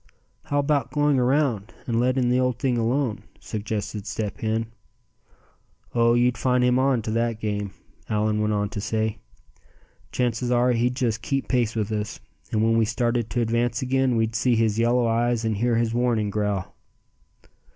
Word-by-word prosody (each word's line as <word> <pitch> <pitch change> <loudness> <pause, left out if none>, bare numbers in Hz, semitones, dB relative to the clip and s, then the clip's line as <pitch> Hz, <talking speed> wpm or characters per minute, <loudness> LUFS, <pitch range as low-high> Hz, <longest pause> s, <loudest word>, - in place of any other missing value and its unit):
"How 145 -2 -1
about 140 -3 +1
going 145 -1 +2
around, 125 -5 +1
and 115 -1 0
letting 125 0 +2
the 125 +1 +3
old 125 -2 +1
thing 130 -1 0
alone?" 120 0 0 0.2
suggested 105 -1 -4
Step 105 -3 -4
Hen. 110 +1 -1 1.3
"Oh! 115 0 +4
you'd 120 -1 +2
find 125 +2 +2
him 125 +1 +3
on 130 -4 +2
to 110 - -3
that 115 0 0
game," 105 -2 -2 0.4
Allan 105 0 +1
went 105 0 +1
on 105 -1 0
to 100 - -5
say. 110 0 -1 0.9
"Chances 125 0 -1
are 125 0 +3
he'd 120 +1 +1
just 115 -4 -1
keep 135 -1 -2
pace 120 -3 +1
with 110 -1 -1
us; 105 -1 -3 0.3
and 110 0 +1
when 115 0 +3
we - - +4
started 120 0 0
to 120 - -1
advance 120 +1 0
again, 130 -1 +1
we'd 115 0 0
see 120 +1 +2
his 110 -1 +1
yellow 120 +1 +3
eyes, 115 0 +1
and 110 -2 0
hear 120 +2 +1
his 115 0 +1
warning 120 -4 +1
growl." 105 -3 -2
115 Hz, 170 wpm, -24 LUFS, 110-125 Hz, 1.3 s, Oh